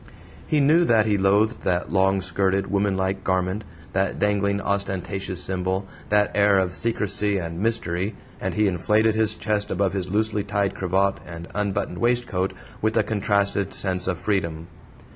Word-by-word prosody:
He 155 Hz, -, +2 dB
knew 155 Hz, +5 st, +5 dB
that 110 Hz, -5 st, +4 dB
he 105 Hz, -2 st, +1 dB
loathed 105 Hz, +4 st, +2 dB
that 90 Hz, -2 st, -1 dB
long 95 Hz, 0 st, +3 dB
skirted, 95 Hz, +2 st, 0 dB
womanlike 95 Hz, -1 st, 0 dB
garment, 95 Hz, +2 st, 0 dB, 0.3 s
that 95 Hz, 0 st, 0 dB
dangling, 100 Hz, -1 st, +1 dB
ostentatious 95 Hz, -2 st, -2 dB
symbol, 95 Hz, +1 st, -2 dB, 0.2 s
that 105 Hz, 0 st, +3 dB
air 100 Hz, -1 st, +4 dB
of 95 Hz, -2 st, +1 dB
secrecy 105 Hz, -2 st, 0 dB
and 85 Hz, -2 st, -4 dB
mystery, 100 Hz, -3 st, -1 dB, 0.2 s
and -, -, -3 dB
he 105 Hz, -1 st, +3 dB
inflated 105 Hz, +4 st, +2 dB
his 110 Hz, -1 st, +1 dB
chest 105 Hz, -2 st, -1 dB
above 95 Hz, 0 st, 0 dB
his 95 Hz, -2 st, -2 dB
loosely 105 Hz, +1 st, +1 dB
tied 100 Hz, -1 st, -1 dB
cravat 95 Hz, +1 st, 0 dB
and 85 Hz, -1 st, -9 dB
unbuttoned 100 Hz, -3 st, -2 dB
waistcoat 120 Hz, -6 st, 0 dB, 0.3 s
with 110 Hz, +1 st, +1 dB
a 110 Hz, -, +4 dB
contrasted 100 Hz, -2 st, 0 dB
sense 90 Hz, -2 st, 0 dB
of 90 Hz, -2 st, 0 dB
freedom. 85 Hz, -4 st, -2 dB
100 Hz, 155 wpm, -24 LUFS, 95-105 Hz, 0.3 s, knew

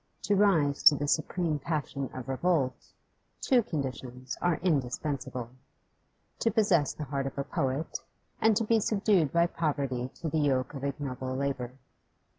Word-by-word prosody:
To 205 Hz, -, +2 dB
rise 165 Hz, -9 st, +3 dB
to 150 Hz, -, +10 dB
the 145 Hz, +1 st, -2 dB
supreme 155 Hz, 0 st, 0 dB
passion 140 Hz, -3 st, -3 dB
of 130 Hz, -2 st, -7 dB
revolt, 135 Hz, -1 st, +1 dB, 0.7 s
two 255 Hz, -2 st, +3 dB
conditions 130 Hz, -, -5 dB
are 175 Hz, -1 st, +2 dB
indispensable: 135 Hz, -5 st, -1 dB, 0.9 s
to 230 Hz, -, +2 dB
possess 200 Hz, -, +3 dB
the 155 Hz, -, -6 dB
heart 135 Hz, -1 st, -2 dB
of 135 Hz, -, -7 dB
a 140 Hz, -, 0 dB
poet, 135 Hz, +3 st, -2 dB, 0.4 s
and 220 Hz, -1 st, +4 dB
to 230 Hz, -, +1 dB
be 225 Hz, +1 st, +3 dB
subdued 200 Hz, -, +2 dB
by 170 Hz, 0 st, +4 dB
poverty 140 Hz, -7 st, -2 dB
to 165 Hz, -, -5 dB
the 160 Hz, 0 st, 0 dB
yoke 135 Hz, -2 st, +1 dB
of 135 Hz, -1 st, -7 dB
ignoble 130 Hz, -2 st, -3 dB
labour. 135 Hz, -2 st, -2 dB
145 Hz, 150 wpm, -29 LUFS, 130-170 Hz, 0.9 s, to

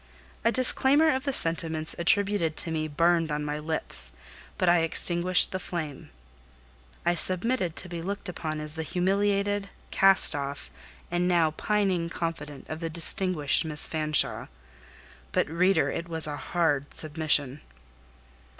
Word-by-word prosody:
A 230 Hz, -, +2 dB
disclaimer 270 Hz, +5 st, +4 dB
of 260 Hz, +1 st, -4 dB
the 280 Hz, -, -1 dB
sentiments 165 Hz, -6 st, +1 dB
attributed 185 Hz, -2 st, +1 dB
to 165 Hz, -, 0 dB
me 155 Hz, -1 st, -3 dB
burned 165 Hz, +1 st, 0 dB
on 150 Hz, 0 st, -3 dB
my 150 Hz, 0 st, -4 dB
lips, 150 Hz, -, +3 dB, 0.4 s
but 185 Hz, -, -1 dB
I 175 Hz, 0 st, +4 dB
extinguished 175 Hz, +2 st, +2 dB
the 185 Hz, -, -4 dB
flame. 160 Hz, -6 st, -7 dB, 1.0 s
I 175 Hz, -, +2 dB
submitted 185 Hz, +2 st, +1 dB
to 185 Hz, -, -3 dB
be 170 Hz, -2 st, -7 dB
looked 200 Hz, +4 st, -6 dB
upon 155 Hz, -3 st, -5 dB
as 150 Hz, 0 st, -6 dB
the 160 Hz, -, -4 dB
humiliated, 200 Hz, +4 st, -1 dB, 0.2 s
cast 195 Hz, -2 st, +5 dB
off, 140 Hz, -1 st, -6 dB, 0.4 s
and 175 Hz, 0 st, -1 dB
now 170 Hz, -3 st, +2 dB
pining 190 Hz, -2 st, -1 dB
confidante 165 Hz, -4 st, -6 dB
of 155 Hz, -, -7 dB
the 165 Hz, -1 st, -5 dB
distinguished 170 Hz, -2 st, +3 dB
Miss 150 Hz, -2 st, -1 dB
Fanshawe: 155 Hz, -1 st, 0 dB, 0.8 s
but, -, -, 0 dB
reader, 180 Hz, +5 st, +1 dB
it 170 Hz, +1 st, -6 dB
was 160 Hz, -1 st, 0 dB
a 150 Hz, -1 st, -4 dB
hard 145 Hz, -1 st, -2 dB
submission. 150 Hz, -3 st, -1 dB
170 Hz, 140 wpm, -26 LUFS, 155-185 Hz, 1.0 s, cast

